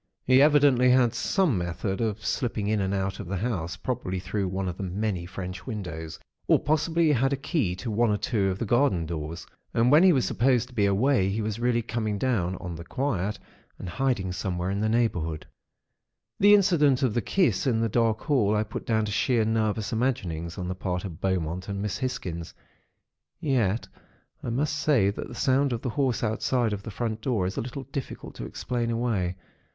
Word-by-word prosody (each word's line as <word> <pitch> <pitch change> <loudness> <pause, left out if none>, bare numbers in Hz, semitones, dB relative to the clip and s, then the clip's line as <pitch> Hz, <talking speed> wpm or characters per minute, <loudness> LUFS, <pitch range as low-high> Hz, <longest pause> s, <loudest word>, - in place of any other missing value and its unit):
He 130 +1 +6
evidently 140 -4 +5
had 125 -2 +4
some 145 - +1
method 90 +3 -3
of 110 -1 -2
slipping 115 -6 -1
in 105 -1 +1
and 95 0 -1
out 95 -1 -2
of - - -6
the 100 +2 -2
house, 90 -5 -2
probably 120 -7 -3
through 95 +2 -2
one 95 +1 -2
of 90 - -3
the - - -6
many 95 -1 -2
French 90 +1 -7
windows, 85 -8 -5 0.3
or - - +6
possibly 160 +3 +1
he 155 - +4
had 135 +2 +2
a - - 0
key 135 - -1
to 110 +5 -5
one 115 +2 +2
or 105 - +2
two 105 -2 0
of 95 - -2
the 115 - -2
garden 115 -7 +2
doors; 80 +1 -5 0.3
and 115 +2 +4
when 150 +3 +7
he 185 0 +7
was 135 -6 +2
supposed 125 0 +2
to - - -16
be 105 -4 +2
away, 100 0 +2
he 100 +3 -2
was 110 0 -2
really 120 -1 +1
coming 110 -2 -2
down, 100 -7 0
on 90 -2 -6
the 85 +1 -7
quiet, 105 -3 -2 0.4
and - - -7
hiding 95 -1 -1
somewhere 90 0 -2
in 100 - -1
the 110 +1 +1
neighbourhood. 85 -10 0 0.9
"The 205 +1 +8
incident 150 -9 +3
of 125 -5 +2
the 120 - +1
kiss 180 -3 +1
in 115 -3 +2
the 115 - +2
dark 115 0 +1
hall, 115 -9 +2
I 105 - +2
put 105 - -7
down 110 -2 +2
to 105 - -4
sheer 115 +2 +2
nervous 110 0 0
imaginings 85 -9 -2
on 90 - -4
the 90 - -2
part 90 0 -3
of 85 -3 -8
Beaumont 90 -1 -1
and 100 0 -3
Miss 105 -1 -3
Hisgins; 90 -11 -4 0.8
yet, 120 - 0 0.5
I - - -4
must 145 +6 0
say 135 -10 +3
that - - -6
the 120 - -9
sound 135 +2 +2
of 120 -1 -3
the 125 - -1
horse 130 -1 0
outside 115 +1 0
of 100 - -4
the 105 - -8
front 110 +1 -3
door, 115 -7 0
is 95 - -3
a - - -1
little 130 +3 -6
difficult 135 0 -6
to - - -5
explain 120 -2 -3
away. 115 -7 -1
110 Hz, 210 wpm, -26 LUFS, 95-125 Hz, 0.9 s, The